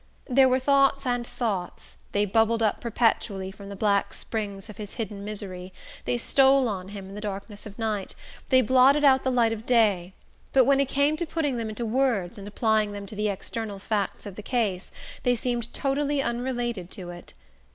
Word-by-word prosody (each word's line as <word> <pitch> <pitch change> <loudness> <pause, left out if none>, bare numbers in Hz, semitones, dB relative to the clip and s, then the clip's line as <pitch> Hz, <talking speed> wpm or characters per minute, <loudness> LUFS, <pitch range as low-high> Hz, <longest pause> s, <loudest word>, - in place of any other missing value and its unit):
There 265 0 +5
were 255 - +3
thoughts 275 +1 +3
and 245 -1 -1
thoughts: 200 -7 -4 0.2
they 205 0 +2
bubbled 225 +3 +2
up 215 - +1
perpetually 215 -4 0
from 195 0 -11
the 200 - -6
black 200 0 +1
springs 200 -3 -5
of 215 - -11
his 210 -3 -7
hidden 205 -3 -5
misery, 190 -3 -6 0.3
they 245 - 0
stole 270 +2 +4
on 190 -4 -4
him 200 -1 -8
in - - -10
the 210 - -7
darkness 205 +1 -6
of 205 - -12
night, 215 -4 -2 0.3
they 260 -1 +5
blotted 260 +5 +5
out 265 -2 +6
the 260 - +1
light 235 -3 +3
of 225 +1 -8
day; 200 -7 +2 0.4
but 260 -2 +6
when 275 +1 +4
it 275 - +2
came 285 +2 +2
to 345 0 -2
putting 290 -6 -1
them 225 -2 -3
into 215 +2 -4
words 225 -6 0
and 200 - -8
applying 215 0 +1
them 200 0 -6
to 205 - -9
the 210 0 0
external 205 +1 -4
facts 205 0 -2
of 200 -3 -7
the - - -5
case, 210 -5 -1 0.3
they 245 0 +2
seemed 240 0 -2
totally 285 +1 0
unrelated 240 -6 -2
to 180 -3 -7
it. 175 0 -12
225 Hz, 195 wpm, -26 LUFS, 200-255 Hz, 0.4 s, out